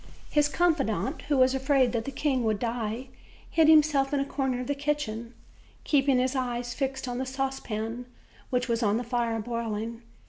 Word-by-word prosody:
His 295 -1 +3
confidant, 275 - 0
who 290 - +3
was 260 0 +5
afraid 265 -2 +2
that 230 -2 -2
the 275 - -4
king 265 -2 0
would 220 -2 +1
die, 230 +2 -3 0.4
hid 320 -2 +4
himself 295 -3 +5
in 285 - +1
a 275 - 0
corner 265 -3 -1
of 250 - -3
the 285 - 0
kitchen, 265 -6 -3 0.5
keeping 275 -3 +3
his 255 +2 +1
eyes 245 -2 -2
fixed 270 -1 -3
on 245 0 -3
the 260 - -1
saucepan, 245 -3 -3 0.4
which 250 0 0
was 230 -1 0
on 210 -1 +2
the 245 - -2
fire 235 -1 -1
boiling. 230 0 -3
255 Hz, 180 wpm, -28 LUFS, 230-275 Hz, 0.5 s, was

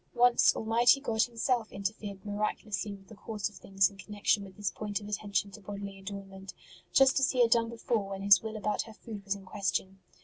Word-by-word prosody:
Once 245 0 +5
Almighty 235 +4 +4
God 225 -5 0
Himself 235 -1 0
interfered 200 0 -5
miraculously 205 -1 -2
with 195 -1 -11
the - - -12
course 210 -2 -4
of 210 - -19
things 195 -1 +2
in 200 - -13
connection 205 0 0
with 190 -1 -12
this 205 -2 -1
point 210 -1 -3
of 205 - -10
attention 205 -1 -1
to 210 - -11
bodily 200 0 -7
adornment, 195 -1 -8 0.4
just 270 0 +5
as 265 - +3
He 255 - +2
had 230 - +2
done 230 -1 +4
before 230 -3 -2
when 195 0 -5
His 200 -2 +7
will 220 -1 -5
about 210 -1 -1
her 225 - -10
food 215 -2 -9
was 200 0 -1
in 195 -1 -12
question. 190 0 -2
205 Hz, 210 wpm, -30 LUFS, 195-225 Hz, 0.4 s, His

